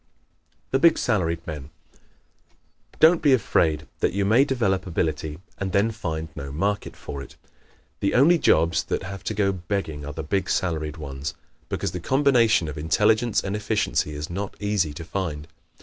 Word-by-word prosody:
The 135 - +2
Big 165 +2 +5
Salaried 85 -5 0
Men 75 -4 -6 0.3
¶ - - -33
Don't 165 +2 +6
be 145 -4 +5
afraid 80 - +2
that - - +1
you 100 0 0
may 115 +7 +5
develop 100 -9 0
ability 80 -3 -2 0.2
and 95 -2 -3
then 105 +3 +3
find 80 -7 -4
no 70 0 -6
market 100 +7 -2
for 70 -1 -7
it. 70 - -11 0.6
The 100 - 0
only 165 +7 +6
jobs 85 - +3
that - - -2
have 95 +1 -7
to 110 - -2
go 100 -1 +2
begging 90 -5 -3
are 75 +1 -6
the 80 - -5
big 95 +4 -1
salaried 80 -3 -1
ones, 70 -2 -5 0.3
because - - -2
the 90 - -4
combination 120 - +3
of 75 0 -5
intelligence 110 +8 +2
and 100 +1 -2
efficiency 105 -7 0
is 75 +1 -4
not 95 +3 -5
easy 105 -6 0
to 80 +3 -8
find. 80 -4 -4
95 Hz, 170 wpm, -24 LUFS, 80-105 Hz, 0.6 s, Don't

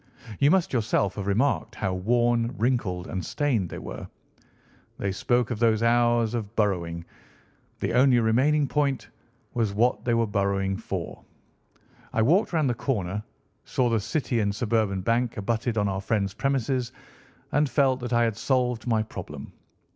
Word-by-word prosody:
You 140 - +5
must 190 0 +2
yourself 110 -4 +1
have 100 -1 -5
remarked 120 +8 +1
how 95 -2 -2
worn, 120 +4 +1
wrinkled, 110 -7 0
and 95 -2 -4
stained 115 - 0
they - - -7
were. - - -7 0.9
They 100 - -2
spoke 120 +4 0
of 115 - -3
those 115 -1 +3
hours 120 -1 +3
of 110 -2 -4
burrowing. 85 -5 -1 0.8
The - - -1
only 125 0 +5
remaining 135 +6 +2
point 140 -2 0 0.5
was 110 -5 0
what 120 +4 +2
they 120 -1 +1
were 115 0 +2
burrowing 100 -1 0
for. 95 -5 -5 0.9
I 110 - +2
walked 175 - +3
round 160 -5 +1
the 125 - +1
corner, 105 -6 -2 0.4
saw 125 -2 0
the 115 - +2
City 120 +3 -1
and 100 -2 0
Suburban 105 -4 0
Bank 115 +4 0
abutted 115 +2 -1
on 105 -1 +2
our 95 0 -2
friend's 100 -1 -1
premises, 130 0 -1 0.6
and 145 0 +2
felt 130 0 +2
that 125 0 -5
I 120 -1 +3
had 115 -2 0
solved 125 +1 0
my 110 -2 +2
problem. 85 -9 -8
115 Hz, 160 wpm, -26 LUFS, 100-125 Hz, 0.9 s, You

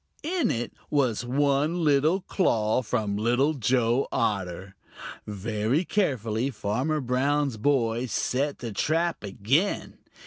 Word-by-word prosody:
In 340 +2 0
it 120 +1 -2 0.2
was 130 -6 +1
one 145 +6 +1
little 155 +5 +3
claw 115 - +1
from 105 -3 -1
Little 120 +7 +2
Joe 125 0 +1
Otter. 95 -5 -2 0.5
Very 110 - -1
carefully 125 - 0
Farmer 130 +6 -1
Brown's 135 0 0
boy 120 -1 +1
set 140 +4 -1
the 120 -2 -6
trap 165 - 0
again. 115 - -1
125 Hz, 110 wpm, -26 LUFS, 110-145 Hz, 0.5 s, little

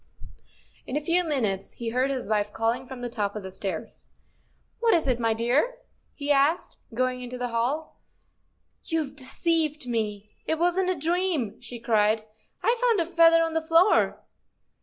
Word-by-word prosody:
" - - -30
In 260 - -2
a - - +2
few 335 +4 +2
minutes 225 - -1
he 235 -1 -4
heard 255 +3 +1
his 265 -2 -3
wife 210 -1 0
calling 230 +4 -1
from 260 -1 -8
the 245 - -2
top 205 -3 -2
of 210 - -5
the 190 - -7
stairs. 185 -3 -5 0.3
" - - -42
What 465 -3 +4
is 325 -4 +1
it, 250 -2 +1
my 225 -1 +1
dear? 250 - +1 0.2
" - - -43
he 285 +1 0
asked, 285 +4 +2
going 255 +2 -1
into 250 0 -6
the 245 0 -3
hall. 245 +7 -2 0.4
" - - -46
You've 310 -4 -1
deceived 305 +1 0
me, 215 -3 -3 0.2
it 320 - +1
wasn't 355 +2 +2
a 370 - +1
dream," 325 - -1
she 240 - -8
cried; 220 -1 +2 0.4
I've 470 +1 +2
found 470 -4 +3
a 335 - +1
feather 330 -1 +5
on 325 0 -2
the 325 - +1
floor! 330 +5 +3
265 Hz, 185 wpm, -26 LUFS, 230-330 Hz, 0.4 s, feather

